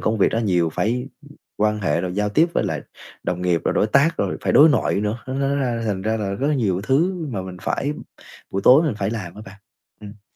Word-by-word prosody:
công 110 0 0
việc - - +4
nó 115 - 0
nhiều, 90 -7 +1
phải, 120 +8 -1 0.2
ưm, 145 0 -16 0.2
quan 105 0 +1
hệ 85 -4 0
rồi 90 0 -4
giao 105 0 0
tiếp 160 +10 +3
với - - +1
lại - - -2 0.4
đồng 90 0 -3
nghiệp, 90 -2 +1
rồi - - 0
đối 105 - +2
tác, 140 +8 +3
rồi - - -1
phải - - 0
đối 155 +3 +8
nội 145 - +1
nữa, 105 +3 -2
nó 130 - -4
nó 140 +1 0
ra 120 -4 -1
thành 95 -2 -2
ra 110 +1 0
là 100 -3 -3
rất 135 +8 -2
là 150 - +2
nhiều 100 -8 0
thứ 160 - 0
mà 100 -7 -4
mình 90 -1 -8
phải 145 +2 -1 0.6
buổi 95 - -2
tối 135 +5 +7
mình 150 -9 0
phải 100 +1 -1
làm 95 -7 -5
á 105 - -10
bạn. 95 +2 -12 0.4
Ừm. 105 0 -12
110 Hz, 255 wpm, -21 LUFS, 95-135 Hz, 0.6 s, đối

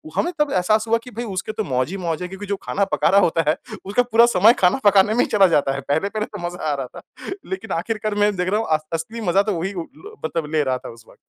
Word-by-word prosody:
हमें 350 - 0
तब 295 -1 +2
एहसास 215 +5 +1
हुआ 230 +1 +3
कि 250 - -11
भई 240 - -2
उसके 195 +4 -3
तो 215 - -3
मौज 130 -5 -1
ही 195 - -4
मौज 170 -3 -3
है 180 - -3
क्योंकि 190 +2 -8
जो 200 0 -2
खाना 200 - 0
पका 150 0 +2
रहा 195 +3 +6
होता 165 -3 +1
है 155 - +3 0.3
उसका 205 +6 +2
पूरा 235 -1 +5
समय 225 0 +5
खाना 180 +7 +3
पकाने 205 +1 +5
में 235 - -1
ही - - 0
चला 200 -2 +6
जाता 145 -5 +2
है। 140 - -4
पहले-पहले 200 +9 0
तो 205 - -9
मज़ा 175 0 -8
आ - - +1
रहा 135 -2 -4
था। - - -14 0.5
लेकिन 190 +4 -5
आखिरकार 215 +4 -2
मैं 205 0 +2
देख 180 0 -1
रहा 210 +2 +1
हूँ 225 - -3
अ 155 - +5 0.2
असली 220 +8 -4
मज़ा 195 -1 +3
तो 210 0 -1
वही 190 +4 -3
उ, 180 - -4
लो 155 - -14
मतलब 160 -2 -3
ले 155 -1 +2
रहा 130 -2 0
था - - -10
उस 115 -1 -14
वक़्त। - - -18
190 Hz, 285 wpm, -21 LUFS, 165-215 Hz, 0.5 s, रहा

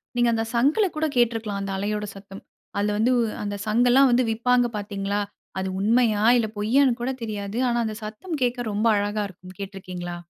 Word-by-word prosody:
நீங்க 240 -1 +3
அந்த 225 0 0
சங்குல 290 - +3
கூட 315 +1 0
கேட்ருக்கலாம், 225 -4 +1
அந்த 195 0 -4
அலையோட 210 +1 -2
சத்தம். 195 0 -11 0.3
அதுல 205 0 +1
வந்து 230 +4 +3
உ - - +3 0.2
அந்த 205 0 -3
சங்கலாம் 245 +4 +5
வந்து 250 +1 +4
விப்பாங்க 245 +2 +2
பாத்தீங்ளா? 205 0 -2 0.4
அது 190 - -2
உண்மையா, 220 0 +3
இல்ல 225 - +1
பொய்யான்னு 240 +3 +3
கூட 250 - -1
தெரியாது. 210 0 -4
ஆனா, 240 - 0
அந்த 215 -1 -3
சத்தம் 285 +10 -5
கேக்க 245 -2 -1
ரொம்ப 215 +3 +1
அழகா 205 +1 -1
இருக்கும் 185 +1 -14
கேட்ருக்கீங்களா? 185 -3 -6
215 Hz, 175 wpm, -24 LUFS, 205-240 Hz, 0.4 s, சங்கலாம்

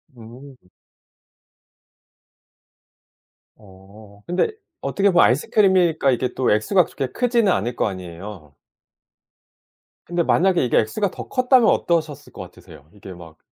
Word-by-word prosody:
음. 125 +4 -13 3.0
어. 100 +1 -18
근데 180 - 0 0.3
어떻게 200 0 0
보면 175 -2 +5
아이스크림이니까 170 - +2
이게 125 0 -2
또 130 - 0
액수가 155 - +2
그렇게 135 - -5
크지는 235 - +1
않을 120 -7 -2
거 - - 0
아니에요? 90 -3 -9 1.5
근데 175 0 -1
만약에 180 0 +2
이게 120 - +1
액수가 185 - -2
더 - - -9
컸다면 255 -2 +3
어떠셨을 155 -4 -1
것 - - -9
같으세요? 75 -1 -15
이게 100 -2 -12
막 85 -2 -14
130 Hz, 275 characters per minute, -21 LUFS, -, 3.0 s, 보면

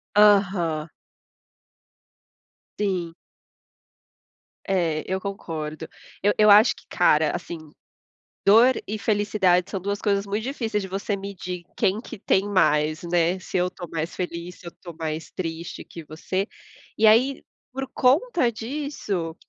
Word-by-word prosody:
Aham. 190 -7 +4 1.9
Sim. 180 -5 -1 1.5
É, 170 -5 0
eu 190 - 0
concordo. 160 -6 -5 0.3
Eu 205 +1 +3
eu 210 0 +6
acho 210 +3 +7
que, - - -18
cara, 155 -3 +3
assim, 175 -1 -6 0.9
dor 230 +6 +6
e 215 +1 -3
felicidade 205 -4 +2
são 195 - -3
duas 200 +2 -3
coisas 200 -1 +1
muito 205 +2 -2
difíceis 230 -6 -2
de - - -5
você 200 +2 -2
medir 185 -3 -6
quem 195 +3 +1
que 235 -1 -9
tem 195 0 +1
mais, 155 -5 +2
né. 175 +1 +1
Se 185 - -4
eu 180 0 +1
tô 175 -1 -9
mais 165 +1 -3
feliz, 175 0 -5
se 175 - -11
eu - - -7
tô 175 -2 -9
mais 160 0 -5
triste 165 -1 -5
que 165 - -10
você. 185 +6 -3 0.5
E 220 - +4
aí, 255 +5 +4 0.3
por 270 0 -4
conta 280 - +3
disso, 220 - -4
190 Hz, 135 wpm, -24 LUFS, 170-210 Hz, 1.9 s, acho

